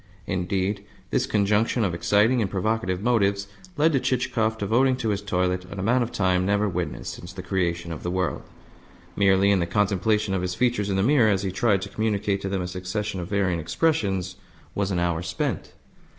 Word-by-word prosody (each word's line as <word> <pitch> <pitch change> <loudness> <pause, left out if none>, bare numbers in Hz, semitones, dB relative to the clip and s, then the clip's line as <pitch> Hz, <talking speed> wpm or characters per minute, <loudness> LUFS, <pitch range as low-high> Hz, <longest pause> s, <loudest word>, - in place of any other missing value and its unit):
Indeed, 95 +3 -1 0.3
this - - +1
conjunction 105 +3 +2
of 95 -4 0
exciting 105 +8 +3
and 100 - 0
provocative 100 -1 -1
motives 100 -4 +2 0.3
led 155 +2 +4
to 135 - +3
Chichikov 115 -3 0
devoting 120 +6 +2
to 115 -3 -2
his 100 -1 -1
toilet 90 -2 0
an 95 +2 -9
amount 115 +7 +2
of 120 0 -2
time 95 -4 +1
never 100 +2 +1
witnessed 90 -2 -3
since 85 - -10
the 90 0 -8
creation 85 -2 -1
of 80 - -8
the 90 - -3
world. 90 -1 -1 0.7
Merely 100 0 +4
in 100 - +3
the 85 - 0
contemplation 105 +2 +1
of 95 - 0
his 90 0 -2
features 120 -5 +1
in 95 - 0
the 95 - +2
mirror, 125 -2 +4
as 100 -1 +1
he 95 - -1
tried 100 0 +1
to 100 - -6
communicate 105 -1 -1
to 95 - -3
them 95 -2 -1
a - - -3
succession 95 +3 -4
of 85 - -5
varying 95 -4 +1
expressions, 95 - 0 0.4
was 100 -1 -1
an 95 - -1
hour 85 -1 0
spent. 85 0 -3
100 Hz, 195 wpm, -25 LUFS, 90-110 Hz, 0.7 s, led